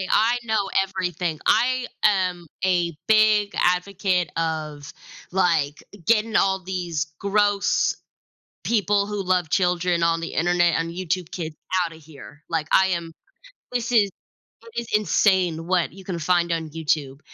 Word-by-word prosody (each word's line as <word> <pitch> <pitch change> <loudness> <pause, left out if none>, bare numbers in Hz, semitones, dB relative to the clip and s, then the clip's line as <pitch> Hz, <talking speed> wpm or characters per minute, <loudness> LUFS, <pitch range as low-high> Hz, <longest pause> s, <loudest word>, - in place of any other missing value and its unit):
hey, 185 - -5
I 230 +3 +4
know 220 -4 0
everything, 180 -4 -3
I 250 +3 +3 0.2
am 185 -4 +2 0.2
a 175 -2 +1 0.2
big 215 -2 +4
advocate 180 0 +1
of, 155 -3 -3 0.4
like, 165 -6 +1 0.2
getting 225 -1 +2
all 190 -1 +2
these 175 -5 -3
gross 205 0 +1 0.7
people 205 -3 +1
who 210 -1 -3
love 180 -3 +1
children 175 -1 +1
on 165 0 +2
the 165 - -4
internet 175 +1 +2
and 165 0 -2
YouTube 180 -1 -3
kids 160 -4 -5 0.3
out 165 - -5
of - - -16
here, 150 -1 -14
like, 160 -2 -2
I 190 0 +5
am 170 -2 -3 0.6
this 245 0 -2
is 210 -4 +4 0.5
it 230 +1 -5
is 235 - -9
insane 185 -6 +2
what 180 -2 +1
you 190 +2 -13
can 180 -2 -4
find 170 +1 +1
on 160 -1 -2
YouTube, 150 -3 -2
180 Hz, 145 wpm, -23 LUFS, 165-200 Hz, 0.7 s, I